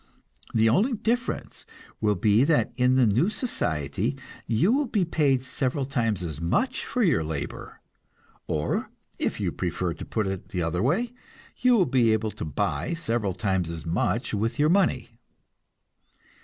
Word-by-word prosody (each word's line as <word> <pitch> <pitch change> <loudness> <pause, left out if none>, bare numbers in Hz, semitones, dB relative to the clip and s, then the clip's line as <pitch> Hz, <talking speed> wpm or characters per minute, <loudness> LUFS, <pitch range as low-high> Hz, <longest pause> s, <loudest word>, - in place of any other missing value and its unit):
The 110 0 +3
only 205 - +3
difference 235 +3 -2 0.4
will 105 -1 +2
be 105 +5 +3
that 145 -5 +2
in 125 +1 +3
the 130 -2 +5
new 115 - +3
society 95 - -1 0.3
you 120 - +3
will 280 +2 +2
be 205 -5 +1
paid 140 -6 +1
several 135 +1 -1
times 115 -8 -1
as 80 -3 -5
much 85 - 0
for 250 - 0
your 150 - +3
labor; 75 -2 -6 0.7
or, 75 0 -1 0.3
if - - -1
you - - -1
prefer 85 0 -2
to - - -9
put 110 -2 -2
it 95 -1 -4
the 90 -2 -2
other 85 +2 -1
way, 205 - +1 0.4
you 250 -1 +4
will 190 -6 +4
be 120 -6 +3
able 110 0 0
to - - -7
buy 75 - -1
several 115 - -1
times 95 -2 0
as 85 -1 -6
much 90 +9 -1
with 115 +3 -1
your 150 +1 +3
money. 190 0 +2
115 Hz, 160 wpm, -26 LUFS, -, 0.7 s, the